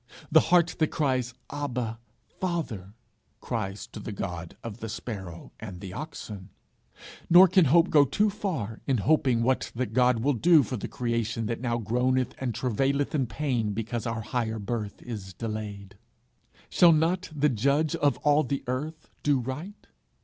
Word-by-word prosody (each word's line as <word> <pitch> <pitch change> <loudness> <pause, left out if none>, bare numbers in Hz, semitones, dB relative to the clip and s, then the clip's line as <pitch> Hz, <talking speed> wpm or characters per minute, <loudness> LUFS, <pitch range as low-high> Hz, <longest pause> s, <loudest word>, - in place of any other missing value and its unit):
the - - +8
heart 175 -2 +4
that 155 - +4
cries 130 -5 -1 0.2
Abba, 125 -6 -3 0.4
Father, 130 - -3 0.4
cries 100 +2 -4
to 115 -1 -10
the 105 - -6
God 90 -4 -5
of 115 -1 -7
the 110 - -5
sparrow 95 -6 -7
and 95 -5 -8
the 95 -1 -8
oxen; 105 -9 -7 0.8
nor 180 +3 +9
can 185 -1 +4
hope 165 +6 +4
go 145 -2 +7
too 205 - +1
far 160 - -4
in 135 -3 +2
hoping 130 -6 +3
what 130 +2 +1
that 125 +1 -2
God 125 -2 +3
will 145 +2 +3
do 160 +5 +5
for 130 - -4
the 105 - -4
creation 115 -1 -2
that 115 +1 -3
now 120 -2 0
groaneth 125 +3 0
and 125 -4 -2
travaileth 135 +4 0
in 135 -5 +1
pain 120 -6 -1
because 115 +2 -3
our 115 -1 -2
higher 110 0 -2
birth 105 -1 -4
is 100 -6 -7
delayed. 105 -3 -6 0.7
Shall 170 -2 +6
not 175 +4 +1
the 150 -1 +2
judge 140 +6 +1
of 145 -1 +2
all 150 +1 +5
the 140 -1 -2
earth 150 +6 -4
do 145 -2 +2
right? 145 - -6
125 Hz, 165 wpm, -27 LUFS, 110-150 Hz, 0.8 s, nor